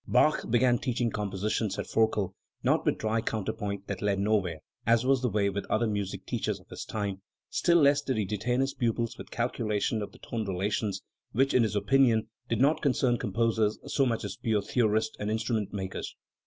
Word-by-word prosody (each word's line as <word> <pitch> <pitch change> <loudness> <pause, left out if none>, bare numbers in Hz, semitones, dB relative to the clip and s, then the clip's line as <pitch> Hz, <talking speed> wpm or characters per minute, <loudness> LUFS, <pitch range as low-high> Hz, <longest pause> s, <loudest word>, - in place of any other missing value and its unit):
"Bach 155 - +3
began 120 +1 +3
teaching 120 -2 0
composition 105 +2 -1
53, 95 - -4
says - - -12
Forkel, 105 -4 +2 0.3
"not - - +3
with - - +2
dry 110 +1 0
counterpoint 100 -2 -3
that - - -5
led 100 -1 +1
nowhere, 100 -6 0 0.2
as 115 +2 +3
was 135 -1 +3
the 125 - +1
way 100 -1 +1
with 100 0 -3
other 110 +2 +2
music 105 -3 -3
teachers - - -2
of - - -21
his - - -7
time; 100 -3 -3 0.3
still 170 -1 +3
less 145 -2 +5
did 130 -4 -2
he 105 - +1
de 105 +3 -2
tain 120 +5 0
his 135 +1 0
pupils 115 -1 -1
with - - -8
calculation 110 -2 -1
of 100 - -5
the - - -16
tone 115 -2 -4
relations, 100 +1 -1 0.3
which 135 +4 +2
in 125 - +5
his 110 -2 +1
opinion, 115 +1 +3 0.2
did 115 - 0
not 145 +5 +3
concern 125 -3 +2
composers 110 0 +1
so 140 - +1
much 115 -2 -1
as - - -5
pure 110 -3 0
theorists 110 0 +1
and 105 - -2
instrument 110 -1 -1
makers. 95 -2 -5
110 Hz, 200 wpm, -29 LUFS, 105-120 Hz, 0.3 s, less